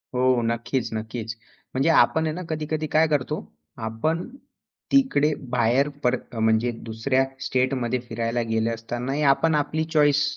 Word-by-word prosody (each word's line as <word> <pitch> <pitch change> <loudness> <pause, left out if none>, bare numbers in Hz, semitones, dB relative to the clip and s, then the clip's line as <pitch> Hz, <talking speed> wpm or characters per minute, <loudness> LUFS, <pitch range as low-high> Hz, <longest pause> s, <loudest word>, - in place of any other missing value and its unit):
हो. 125 -1 +3
नक्कीच, 115 +1 -1
नक्कीच, 110 0 -4 0.4
म्हणजे 135 +5 +2
आपण 160 0 +4
आहे 155 - -1
ना, 180 - -5
कधी-कधी 155 0 -2
काय 160 +1 +5
करतो, 150 0 0 0.5
आपण 155 +10 -1 0.6
तिकडे 155 - +3 0.2
बाहेर 125 +3 +2 0.2
पर 125 0 +3 0.2
म्हणजे 110 +2 +2 0.2
दुसऱ्या 130 +4 +1 0.2
स्टेटमध्ये 130 -1 0
फिरायला 115 +1 -1
गेले 110 0 +1
असतानाही 120 +5 -3
आपण 155 +3 +1
आपली 150 +2 0
चॉईस 150 -1 +4
130 Hz, 135 wpm, -24 LUFS, 115-150 Hz, 0.6 s, काय